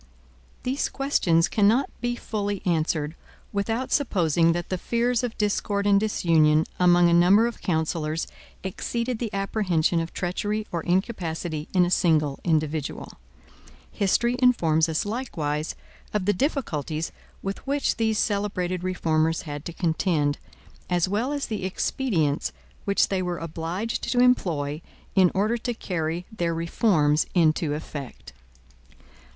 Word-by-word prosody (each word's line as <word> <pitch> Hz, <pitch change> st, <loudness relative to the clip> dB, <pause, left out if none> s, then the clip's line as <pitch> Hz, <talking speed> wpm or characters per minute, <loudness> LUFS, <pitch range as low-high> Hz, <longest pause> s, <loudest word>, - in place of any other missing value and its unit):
These 260 Hz, +3 st, -1 dB
questions 175 Hz, -, +2 dB
cannot 220 Hz, +6 st, +3 dB
be 240 Hz, 0 st, -1 dB
fully 205 Hz, -4 st, -3 dB
answered, 160 Hz, -3 st, 0 dB, 0.4 s
without 225 Hz, +5 st, -1 dB
supposing 170 Hz, -, +2 dB
that 175 Hz, 0 st, -4 dB
the 185 Hz, -, -1 dB
fears 235 Hz, +2 st, +1 dB
of 240 Hz, -2 st, -3 dB
discord 205 Hz, -1 st, 0 dB
and 200 Hz, -1 st, +5 dB
disunion 160 Hz, -7 st, +3 dB
among 175 Hz, -1 st, +5 dB
a 170 Hz, -, +3 dB
number 185 Hz, +6 st, +6 dB
of 235 Hz, -1 st, -4 dB
counsellors 160 Hz, -1 st, -1 dB, 0.4 s
exceeded 235 Hz, +5 st, -3 dB
the 230 Hz, -4 st, -3 dB
apprehension 190 Hz, -5 st, +1 dB
of 165 Hz, 0 st, -3 dB
treachery 205 Hz, +4 st, -2 dB
or 170 Hz, -, -2 dB
incapacity 175 Hz, -4 st, -2 dB
in 180 Hz, -1 st, +5 dB
a 175 Hz, -, -2 dB
single 155 Hz, -6 st, +2 dB
individual. 155 Hz, -3 st, -2 dB, 0.7 s
History 235 Hz, +5 st, +1 dB
informs 165 Hz, -11 st, +3 dB
us, 160 Hz, +4 st, -1 dB
likewise, 165 Hz, -, -3 dB, 0.4 s
of 200 Hz, -3 st, 0 dB
the 205 Hz, -, +3 dB
difficulties 165 Hz, -, -2 dB, 0.3 s
with 195 Hz, 0 st, -3 dB
which 280 Hz, +1 st, 0 dB
these 220 Hz, -2 st, +1 dB
celebrated 195 Hz, -4 st, -1 dB
reformers 165 Hz, -3 st, 0 dB
had 145 Hz, -1 st, -6 dB
to -, -, -4 dB
contend, 160 Hz, -3 st, 0 dB, 0.5 s
as 175 Hz, 0 st, +2 dB
well 215 Hz, +8 st, -1 dB
as 290 Hz, -1 st, -2 dB
the 215 Hz, -4 st, -4 dB
expedients 185 Hz, -, 0 dB, 0.3 s
which 200 Hz, 0 st, +2 dB
they 190 Hz, -1 st, 0 dB
were 180 Hz, -1 st, -2 dB
obliged 165 Hz, +7 st, -3 dB
to 245 Hz, -, +2 dB
employ 165 Hz, -, +2 dB, 0.3 s
in 185 Hz, -2 st, +5 dB
order 215 Hz, +5 st, +1 dB
to 240 Hz, +1 st, -3 dB
carry 170 Hz, -4 st, -3 dB
their 170 Hz, -4 st, -1 dB
reforms 165 Hz, -3 st, +2 dB
into 155 Hz, -3 st, +2 dB
effect. 140 Hz, -, -8 dB
180 Hz, 135 wpm, -25 LUFS, 160-215 Hz, 0.7 s, number